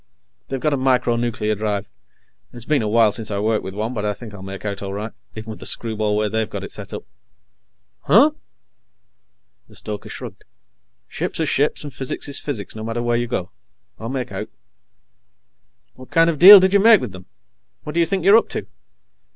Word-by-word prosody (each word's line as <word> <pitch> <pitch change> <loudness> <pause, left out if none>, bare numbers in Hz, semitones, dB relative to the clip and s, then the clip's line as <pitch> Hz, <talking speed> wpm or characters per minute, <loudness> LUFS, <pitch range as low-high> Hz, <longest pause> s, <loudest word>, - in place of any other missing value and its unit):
They've 135 - -4
got 150 +2 0
a - - +1
micro 125 -2 +1
nuclear 115 -2 -1
drive. 105 -1 -3 0.6
It's 120 -2 -9
been 150 -4 +1
a 110 - -2
while 110 0 +4
since 110 +1 -1
I 100 - -2
worked 110 +1 0
with 95 0 -7
one, 110 +4 -3
but 105 -4 -4
I 105 -1 -1
think 110 -2 -11
I'll 100 - -10
make 95 +1 -8
out 100 -1 -4
all 100 -1 -5
right, 105 +2 -5 0.2
even 110 0 -7
with 110 - -9
the - - -7
screwball 110 -2 -2
way 105 0 +1
they've 110 0 -2
got - - -6
it - - -7
set - - -7
up." - - -6 1.0
"Huh?" - - +6 1.4
The - - -17
stoker 105 -1 -6
shrugged. - - -8 0.6
"Ships - - -4
are 160 - +1
ships, 145 +1 0
and 145 -2 -8
physics 130 +2 -2
is 140 - +1
physics, 115 -10 -4
no 110 - -7
matter 115 +1 -3
where 120 0 +1
you 120 0 -1
go. 95 -6 -4 0.5
I'll 115 - -6
make 130 -2 -4
out." - - -5 1.4
"What 130 0 -14
kind 165 0 +4
of 155 - -6
a - - -16
deal 195 +3 +12
did 190 +1 +2
you 200 - +5
make 220 +1 +7
with 125 - -5
them? 90 0 -12 0.6
What 150 - -6
do 170 - 0
you 165 - +3
think 190 -3 -2
you're 200 +3 +8
up 230 - 0
to?" - - -3
115 Hz, 215 wpm, -21 LUFS, 105-140 Hz, 1.4 s, deal